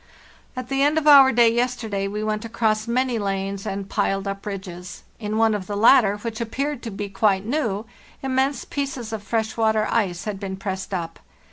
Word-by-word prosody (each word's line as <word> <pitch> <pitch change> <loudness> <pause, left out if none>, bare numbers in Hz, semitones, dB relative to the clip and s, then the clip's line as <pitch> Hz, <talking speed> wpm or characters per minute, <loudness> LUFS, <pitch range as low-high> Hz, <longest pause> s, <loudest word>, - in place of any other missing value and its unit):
"At 255 -1 -6
the 270 0 0
end 295 +2 +3
of 310 -1 0
our 275 -3 +9
day, 235 -1 +4
yesterday, 235 -5 -1
we 210 +2 -4
went 215 0 -2
across 220 -1 0
many 250 0 0
lanes 195 -1 -3
and 195 0 -4
piled 195 0 -1
up 195 +1 -5
ridges; 185 -3 -7 0.2
in 215 -1 -3
one 225 -1 +4
of 195 -3 -4
the 205 - -3
latter, 215 -2 +5
which 225 +1 -5
appeared 275 +4 -3
to 235 - -5
be 205 0 -5
quite 195 0 +1
new, 225 -5 -1 0.4
immense 265 +1 0
pieces 270 -5 -4
of 220 - -4
fresh 220 +2 -2
water 220 -1 +2
ice 185 -6 0
had 205 -2 -4
been 190 -1 -5
pressed 190 0 -5
up. 170 -4 -4
215 Hz, 195 wpm, -23 LUFS, 195-240 Hz, 0.4 s, our